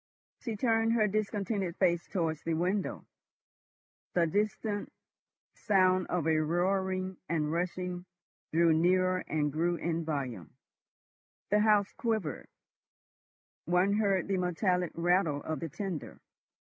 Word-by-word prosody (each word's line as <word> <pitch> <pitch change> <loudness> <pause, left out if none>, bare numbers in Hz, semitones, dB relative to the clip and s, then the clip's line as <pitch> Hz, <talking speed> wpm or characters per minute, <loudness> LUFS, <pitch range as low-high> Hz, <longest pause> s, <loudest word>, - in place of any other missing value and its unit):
She 230 -3 -4
turned 225 0 +2
her 220 -2 +3
discontented 200 -3 -2
face 175 -2 +2
towards 165 -5 -1
the 165 -1 -1
window. 185 +4 -1 1.1
The 175 -1 +4
distant 205 +3 -1 0.6
sound 185 -4 +2
of 175 -4 -1
a 160 -1 +3
roaring 185 +3 0
and 155 -2 0
rushing 180 +1 -3 0.5
drew 165 0 +4
nearer 185 +3 +3
and 150 -2 0
grew 170 +3 +1
in 165 0 -2
volume; 130 - -4 1.0
the 210 - +5
house 210 -2 +3
quivered; 220 - -2 1.2
one 180 +4 +3
heard 200 -4 +1
the 195 -1 0
metallic 180 0 0
rattle 170 -4 +1
of 160 -3 -3
the 165 - -4
tender. 185 0 -5
180 Hz, 120 wpm, -31 LUFS, 165-200 Hz, 1.2 s, the